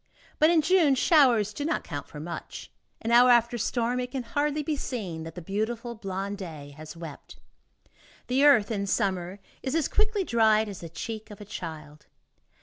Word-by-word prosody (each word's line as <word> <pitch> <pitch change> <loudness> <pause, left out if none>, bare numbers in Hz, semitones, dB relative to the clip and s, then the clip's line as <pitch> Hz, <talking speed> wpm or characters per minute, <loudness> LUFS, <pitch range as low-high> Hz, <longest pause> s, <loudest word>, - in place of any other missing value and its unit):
But 310 - +6
in 330 -2 +4
June, 325 -5 +4
showers 245 - +4
do 285 - -4
not 325 +3 -1
count 145 -4 -6
for 150 - -10
much. 170 +3 -7 0.3
An 230 - -1
hour 245 +1 +7
after 240 0 +4
a - - -7
storm, 240 +2 0
it 250 0 -3
can 260 -1 -4
hardly 290 +5 -1
be 300 +1 -1
seen 200 - -4
that 165 - -9
the 180 - -7
beautiful 225 +6 -3
blonde 195 -1 -5
day 155 -6 -8
has 155 +2 -10
wept. 165 -4 -10 0.9
The 260 +3 +1
earth, 255 -8 +5
in 200 -2 -2
summer, 190 -3 -1 0.2
is 265 +3 -2
as 325 -3 +2
quickly 425 -1 +1
dried 220 -6 +3
as 200 -3 -7
the 170 - -8
cheek 215 +7 -6
of 210 - -11
a 205 - -9
child. 155 -6 -8
220 Hz, 190 wpm, -27 LUFS, 185-260 Hz, 0.9 s, hour